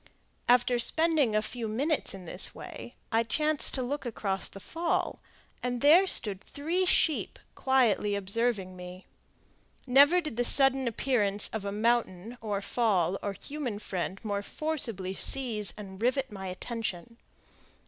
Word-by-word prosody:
After 245 0 +4
spending 310 -4 +2
a 215 - +2
few 230 +1 -4
minutes 275 +2 -1
in 185 -2 -11
this 180 +3 +3
way, 240 - -10 0.2
I 225 0 +3
chanced 300 +6 +2
to 260 - -1
look 285 +4 -3
across 205 -5 -3
the 195 - -11
fall, 335 - -2 0.4
and 245 -1 -2
there 335 +7 +6
stood 200 - +1
three 340 +6 -2
sheep 315 -3 +2 0.2
quietly 235 -6 +2
observing 200 -1 -1
me. 180 +1 -10 0.8
Never 285 +7 +6
did 305 -9 -6
the 245 - +2
sudden 270 +1 +4
appearance 210 -4 +1
of 215 -2 -5
a 200 - -2
mountain, 225 -1 -1
or 205 -3 -3
fall, 195 -4 0
or 200 - -3
human 265 -1 -5
friend 190 -2 -4
more 200 -1 -2
forcibly 230 - -3
seize 225 -3 +1
and 195 -1 -10
rivet 260 +2 0
my 190 -2 -7
attention. 225 +2 -5
230 Hz, 145 wpm, -29 LUFS, 200-270 Hz, 0.8 s, there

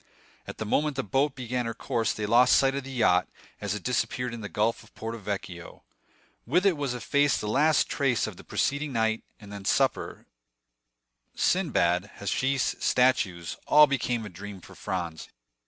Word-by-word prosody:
At - - -7
the 110 - -4
moment 150 +6 +1
the 135 - -1
boat 135 +7 0
began 125 -1 -3
her 115 - -4
course 115 -2 -1
they 105 - -3
lost 120 +4 +5
sight 135 0 +3
of 140 0 -3
the 135 - -8
yacht, 100 -8 +3 0.3
as 105 -1 -2
it 105 - -6
disappeared 125 0 -1
in 115 - -6
the 105 - -6
gulf 110 +2 0
of - - -21
Porto 115 +1 -5
Vecchio. 95 -4 -6 0.6
With 185 +2 +2
it 195 -4 +4
was 140 -4 -2
effaced 145 +4 +2
the 105 - -4
last 150 +7 +3
trace 135 -4 +1
of 110 - -6
the - - -13
preceding 140 +1 -1
night; 110 -1 +1 0.2
and 105 -2 -11
then 100 -1 -7
supper, - - 0 1.1
Sinbad, 100 - +1
hashish, 130 +6 0
statues,—all 125 - +3
became 125 -5 -1
a - - -7
dream 100 +2 -9
for 85 - -14
Franz. 85 -4 -4
115 Hz, 170 wpm, -27 LUFS, 105-135 Hz, 1.1 s, lost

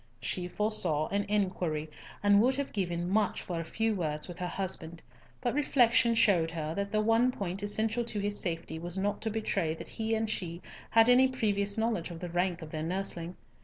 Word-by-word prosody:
She 180 -1 -3
foresaw 180 -7 +1
an 200 +1 0
inquiry, 185 -7 -1 0.4
and 205 0 +6
would 255 +3 +3
have 280 0 -3
given 175 -3 -2
much 205 +2 +1
for 175 -2 -4
a - - -2
few 225 +6 0
words 155 -6 -2
with 175 -2 -9
her 180 - -2
husband; 170 -3 -4 0.4
but 245 -2 0
reflection 245 -4 +3
showed 180 -7 +4
her 160 -1 -4
that 200 +2 -2
the 215 +1 +1
one 225 +3 +3
point 195 -4 -4
essential 220 +3 0
to 220 -2 -3
his 205 0 +3
safety 165 -2 -1
was 175 +2 -5
not 200 +1 -1
to 220 - -2
betray 195 -7 -1
that - - -9
he 225 0 -1
and 220 0 -1
she 175 -5 -3 0.3
had 225 0 +5
any 250 +1 +6
previous 205 -5 0
knowledge 220 -7 0
of 170 -1 -8
the 180 - -5
rank 175 0 -1
of 155 - -9
their 155 - -4
nursling. 175 0 -3
200 Hz, 200 wpm, -30 LUFS, 170-220 Hz, 0.4 s, and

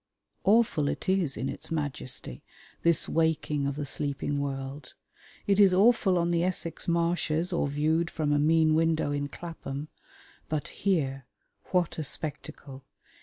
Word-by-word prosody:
Awful 200 -8 +3
it - - -3
is 185 -7 +1
in 130 - -2
its - - -7
majesty 145 - -3 0.4
this 170 -1 +3
waking 155 -3 0
of 140 - -2
the 145 0 -3
sleeping 145 0 -2
world. 135 0 -5 0.5
It 200 0 +2
is 195 -3 +6
awful 200 -2 +4
on 170 0 +1
the 170 0 +2
Essex 175 -2 -2
marshes 170 0 0
or 170 - +1
viewed 155 +4 +1
from 155 -4 -1
a 145 - +3
mean 160 +1 +4
window 160 -2 +2
in 145 0 -1
Clapham. 150 -2 -7 0.6
But 155 -2 -2
here, 135 -9 -1 0.4
what 180 -3 0
a - - -1
spectacle! 140 -2 -7
155 Hz, 145 wpm, -28 LUFS, 145-170 Hz, 0.6 s, is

